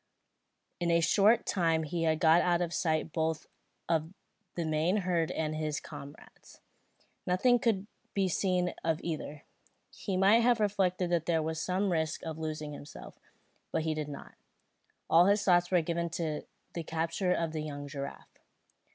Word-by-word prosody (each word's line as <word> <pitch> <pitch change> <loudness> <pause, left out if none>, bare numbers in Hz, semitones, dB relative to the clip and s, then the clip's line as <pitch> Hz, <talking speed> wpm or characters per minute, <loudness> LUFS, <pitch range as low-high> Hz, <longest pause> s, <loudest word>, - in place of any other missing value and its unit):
In 175 -1 0
a 170 0 +4
short 200 +7 +4
time 165 -3 +1
he 165 +2 -2
had 160 -1 +2
got 165 +1 +5
out 175 -1 +2
of 175 -1 -2
sight 160 -2 0
both 160 -1 -1 0.4
of 160 -1 0 0.4
the 170 - -2
main 160 +5 +1
herd 170 -3 +1
and 155 -1 -2
his 155 -1 -2
comrades. 145 -2 -12 0.7
Nothing 245 +7 +3
could 215 -5 +1 0.3
be 195 -2 +2
seen 180 0 0
of 160 -1 0
either. 155 -3 -5 0.5
He 195 -3 -3
might 200 +4 +5
have 240 0 +3
reflected 190 -4 +1
that 170 -2 +1
there 165 -2 +2
was 160 +1 -3
some 190 +2 0
risk 160 -2 -1
of 160 -1 -5
losing 155 -1 -4
himself; 145 +1 -11 0.5
but - - 0
he 160 0 0
did 155 -1 -4
not. 140 - -9 0.7
All 170 +3 +6
his 205 +1 +3
thoughts 175 -2 +4
were 180 -2 +3
given 170 +1 -1
to 155 -3 -3 0.3
the 170 - -3
capture 165 +3 -1
of 165 -2 0
the 155 -1 -3
young 145 -1 -6
giraffe. 140 -1 -8
165 Hz, 165 wpm, -31 LUFS, 155-180 Hz, 0.7 s, All